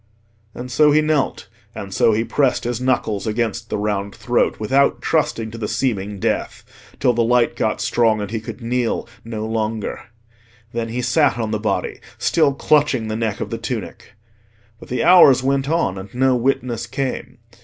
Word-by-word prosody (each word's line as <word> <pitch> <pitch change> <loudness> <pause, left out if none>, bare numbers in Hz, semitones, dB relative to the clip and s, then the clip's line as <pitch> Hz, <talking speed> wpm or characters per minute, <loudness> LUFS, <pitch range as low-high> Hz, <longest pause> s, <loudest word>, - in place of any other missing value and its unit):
And 125 +1 -7
so 150 +2 +4
he 150 - +5
knelt, 155 -2 0 0.3
and 100 -1 -7
so 115 - +4
he 110 +1 +1
pressed 135 +2 +1
his 120 0 -3
knuckles 120 -5 0
against 110 -1 -2
the - - -2
round 100 -1 -2
throat, 120 +2 0
without 135 +6 +2
trusting 115 -8 -1
to 115 - -8
the 105 - -2
seeming 105 -6 -2
death, - - -2 0.4
till 130 -3 +3
the 120 0 +1
light 120 +1 +2
got - - -1
strong 115 -3 +2
and 105 0 -5
he 115 - -2
could 110 - -9
kneel 120 0 -1 0.2
no 110 -1 -5
longer. 110 0 -3 0.7
Then 115 -1 -2
he 125 +2 -3
sat 130 0 +2
on 110 -2 -2
the 110 - -1
body, 110 - -2 0.2
still 155 -4 +2
clutching 140 -6 +2
the 110 - -2
neck 110 -2 -2
of - - -4
the - - -3
tunic. - - -6 0.7
But - - -13
the 125 - -1
hours 140 -8 +7
went 135 +1 0
on, 125 - 0
and 95 +1 -10
no 130 0 +3
witness 120 -2 -1
came. 130 +1 -4
120 Hz, 180 wpm, -20 LUFS, 110-130 Hz, 0.7 s, hours